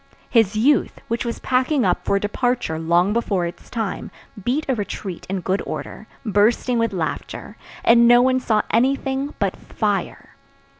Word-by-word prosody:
His 225 -4 +3
youth, 270 +7 +2
which 230 +1 -1
was 235 - -3
packing 255 0 +1
up 180 -1 +1
for 200 - +2
departure 210 -4 -1
long 170 +4 +2
before 200 -6 0
its 170 - -8
time, 220 -5 -3 0.3
beat 270 +8 0
a 265 - +2
retreat 200 -4 -5
in 190 -1 -2
good 190 +2 -1
order, 215 - -7 0.2
bursting 225 +3 +2
with 230 -1 +1
laughter, 170 -5 -4 0.3
and 235 0 +6
no 240 0 +7
one 255 +1 +3
saw 220 -4 +1
anything 270 +3 0
but - - -1
fire. - - -3
230 Hz, 155 wpm, -21 LUFS, 195-250 Hz, 0.3 s, no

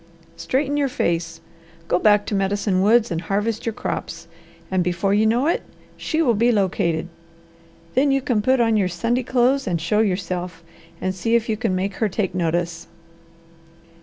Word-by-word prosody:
Straighten 285 +2 -1
your 285 -1 +2
face! 165 - -2 0.5
Go 175 - +2
back 205 0 +4
to - - -4
Medicine 195 -1 0
Woods 225 +2 +3
and 165 -1 -2
harvest 210 +5 -2
your 225 - 0
crops, - - -5 0.4
and 185 -1 +2
before 180 +3 0
you 215 +2 +3
know 240 +5 +2
it 335 - +1 0.3
she 320 0 -1
will 245 -6 +3
be 235 +3 +3
located. 175 -5 0 0.9
Then 275 +3 +3
you 275 0 +3
can 245 -5 0
put 260 +4 +2
on 225 -2 +3
your 195 -3 +2
Sunday 230 +8 -1
clothes 255 +2 +1
and 175 -3 0
show 170 +6 0
yourself, 180 -4 -2 0.4
and 185 0 -2
see 225 +5 0
if 235 -1 +1
you 220 - +1
can 215 -4 -1
make 190 +1 -2
her 220 - +1
take 195 0 -2
notice." 170 -1 -2
205 Hz, 175 wpm, -22 LUFS, 180-235 Hz, 0.9 s, back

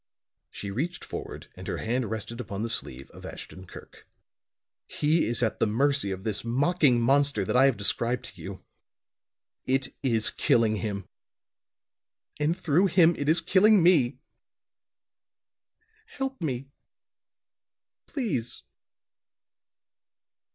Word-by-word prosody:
She 100 - -7
reached 160 - -3
forward - - -7
and - - -10
her - - -2
hand 120 -1 -1
rested 110 +2 -5
upon 100 -3 -5
the 115 - -1
sleeve 65 +2 -4
of - - -13
Ashton 95 0 -9
Kirk. - - -13 0.8
"He 155 -2 +1
is 120 +1 0
at 110 - -1
the - - +3
mercy 140 +1 +1
of 95 0 -5
this 110 -2 -2
mocking 135 +2 +2
monster 135 -3 +2
that - - -1
I 130 +2 +6
have 135 -4 +3
described 115 +4 0
to - - -14
you. - - -8 1.0
It 135 +1 +1
is 115 -5 +1
killing 110 -2 +2
him, 100 -3 -4 1.3
and 155 +4 +1
through 180 +1 +2
him 170 -2 +4
it 145 +1 -2
is 165 +2 +3
killing 195 +3 +5
me. 160 -9 +4 1.9
Help 270 - -5
me, 135 -3 -3 1.4
please." 160 - -3
130 Hz, 125 wpm, -27 LUFS, 110-160 Hz, 1.9 s, I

